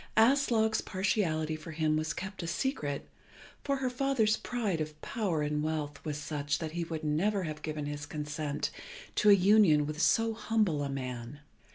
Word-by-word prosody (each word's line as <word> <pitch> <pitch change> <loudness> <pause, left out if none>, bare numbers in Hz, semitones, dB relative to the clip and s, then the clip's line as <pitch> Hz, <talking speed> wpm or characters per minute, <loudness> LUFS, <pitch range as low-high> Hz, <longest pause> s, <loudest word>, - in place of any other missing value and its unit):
Aslog's 225 -2 +4
partiality 165 -6 0
for 155 +1 -9
him 155 -1 +1
was 155 0 0
kept 190 +4 -5
a 170 - -4
secret, 170 - -2 0.6
for 280 - +1
her 265 -2 -1
father's 250 -5 +2
pride 215 -9 -2
of 155 0 -5
power 185 - -1
and 150 0 0
wealth 150 -2 -3
was 150 -2 -3
such 150 -1 -2
that 160 -2 -4
he 170 +1 -2
would 160 -1 -5
never 185 +7 +1
have 155 -2 -5
given 155 -2 -3
his 145 0 -5
consent 150 -1 -3 0.4
to 210 - +4
a - - +10
union 190 -6 +5
with 155 +1 -3
so 225 +4 +3
humble 215 -8 +1
a 140 - -2
man. 130 0 -5
160 Hz, 175 wpm, -31 LUFS, 150-215 Hz, 0.6 s, a